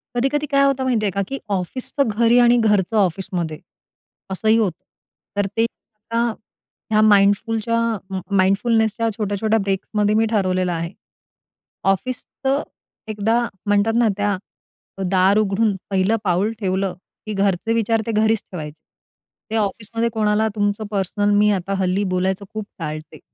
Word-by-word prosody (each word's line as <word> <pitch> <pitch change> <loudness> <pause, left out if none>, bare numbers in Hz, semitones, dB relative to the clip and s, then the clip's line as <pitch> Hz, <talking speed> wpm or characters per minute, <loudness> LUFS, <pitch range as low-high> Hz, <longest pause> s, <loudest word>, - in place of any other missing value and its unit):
कधी-कधी 275 +4 +1
काय 275 0 +4
होतं 270 -1 +1
माहिती 235 -5 +1
आहे 200 - +1
का, 200 - -1
की 275 +4 -4
ऑफिसचं 235 +8 -1
घरी 230 +3 +3
आणि 240 0 +5
घरचं 210 -2 +2
ऑफिसमध्ये 175 -4 -1 0.7
असंही 220 +4 +2
होतं. 185 -5 -1 0.5
तर 205 - +2
ते 225 - +4
आता 230 +1 -4 0.6
या 215 0 +4
माइंडफुलच्या 215 +2 +3 0.6
माइंडफुलनेसच्या 220 +3 +2
छोट्या 205 -2 -1
छोट्या 220 0 +2
ब्रेकमध्ये 205 +2 0
मी 225 +1 +3
ठरवलेलं 185 -3 +1
आहे. 170 0 -3 1.0
ऑफिस 250 +6 -3 0.2
तर 275 +2 +2 0.5
एकदा 215 +2 +1 0.3
म्हणतात 205 +2 +2
ना, 235 -1 +4
त्या 205 -2 0 0.7
दार 190 +2 +4
उघडून 210 0 +1
पहिलं 195 +2 +2
पाऊल 190 +3 +1
ठेवलं 190 -2 -1 0.3
की 215 - -4
घरचे 195 +2 +1
विचार 225 0 +1
ते - - 0
घरीच 220 0 +2
ठेवायचे. 155 -4 -7 0.7
ते 225 - -1
ऑफिसमध्ये 225 +2 -1
कोणाला 215 0 +2
तुमचं 205 +1 0
पर्सनल 205 +1 0
मी 210 0 +4
आता 195 0 -1
हल्ली 190 +2 +1
बोलायचं 190 +2 -1
खूप 215 -1 -4
टाळते. 155 -1 -6
210 Hz, 140 wpm, -21 LUFS, 190-225 Hz, 1.0 s, आणि